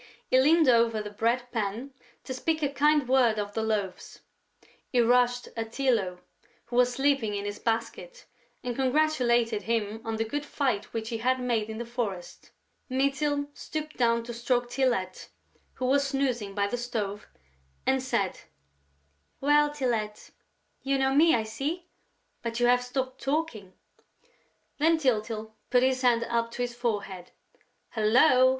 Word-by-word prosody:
He 255 - +6
leaned 315 +2 +5
over 230 -2 +4
the 210 -1 -5
bread 230 +4 0
pan 230 +4 -3 0.3
to 260 - -5
speak 315 +4 -1
a 285 - +2
kind 295 -1 +3
word 250 -4 +4
to 205 -1 -3
the 225 - -1
Loaves; 210 -4 -3 0.7
he 250 - +1
rushed 245 +1 +3
at 225 -1 -4
Tylô, 225 -8 0 0.5
who 240 - -7
was 250 0 +4
sleeping 270 -5 +1
in 200 0 -3
his 205 0 -5
basket, 235 - -3 0.4
and 245 -2 -3
congratulated 250 -5 +2
him 220 -1 -2
on 225 0 -3
the 225 - 0
good 290 +6 -3
fight 260 -8 -1
which 225 0 -4
he 230 -2 -3
had 255 +2 +1
made 235 -4 -1
in 220 - -5
the 235 - -4
forest. 220 -7 -5 0.4
Mytyl 280 +2 0
stooped 305 0 -6
down 235 -1 +2
to 240 +1 -7
stroke 240 +1 -1
Tylette, 240 -9 -1 0.5
who 255 - -3
was 280 +2 +3
snoozing 250 -7 -1
by 200 -1 +1
the 205 +5 -2
stove, 215 -4 -4 0.6
and 265 0 +2
said: 235 -7 -1 1.0
"Well, 295 +1 +4
Tylette?... 235 -7 -3 0.5
You 275 0 0
know 265 0 +2
me, 320 +2 +5
I 225 - 0
see, 295 +11 -4 0.6
but 235 0 -3
you 245 - +3
have 245 0 +4
stopped 260 +1 -4
talking." 270 - -2 1.1
Then 325 +2 +4
Tyltyl 220 -5 -1 0.2
put 250 0 +4
his 260 0 +2
hand 240 -2 +3
up 230 0 -1
to 245 - -2
his 240 -1 -3
forehead: 205 -6 -3 0.6
"Hullo!" 255 +4 +5
245 Hz, 155 wpm, -28 LUFS, 220-270 Hz, 1.1 s, He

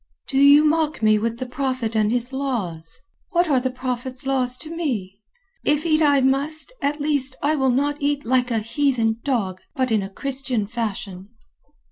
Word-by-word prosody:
"Do 270 - 0
you 285 +2 +7
mock 310 -4 +1
me 215 0 +5
with 230 +1 -2
the 255 - -4
Prophet 255 -3 -2
and 215 -1 +2
his 245 +2 -1
laws? 200 -13 -3 0.3
What 345 0 +2
are 275 -4 +3
the 260 +1 -1
Prophet's 255 0 -3
laws 255 -2 +3
to 320 +2 -7
me? 215 - -3 0.4
If 295 +2 +1
eat 315 -1 +3
I 285 -3 +4
must, 285 - 0
at 290 +2 -1
least 285 -3 -1
I 300 +2 +2
will 265 -3 +2
not 285 +4 0
eat 285 -1 0
like 250 +1 +2
a 230 - 0
heathen 230 -1 0
dog, 200 -9 -1
but 255 -2 0
in 200 -3 +1
Christian 265 -5 -2
fashion." 205 -3 -5
260 Hz, 175 wpm, -22 LUFS, 230-285 Hz, 0.4 s, you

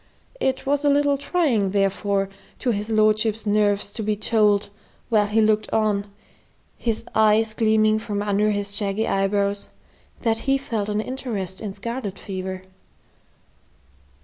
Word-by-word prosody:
It 265 - -1
was 285 +1 +1
a 290 - +4
little 285 0 +3
trying, 275 - +1
therefore, 195 0 0 0.3
to 250 - 0
his 210 0 -3
lordship's 215 0 +2
nerves 205 -1 +1
to 220 - -5
be 215 0 0
told, 210 -1 +2 0.4
while 210 -3 +3
he 220 +2 +2
looked 215 0 +2
on, 205 -2 0 0.6
his 230 -2 -2
eyes 220 0 +3
gleaming 215 -1 +3
from 205 -2 -3
under 205 +1 +1
his 205 -1 -1
shaggy 205 +1 0
eyebrows, 200 +1 0 0.5
that 225 -2 +1
he 270 - +4
felt 220 -6 -3
an 210 0 0
interest 215 -7 -4
in 205 -3 -5
scarlet 230 -3 -5
fever. 185 -1 -6
215 Hz, 140 wpm, -23 LUFS, 200-225 Hz, 0.6 s, a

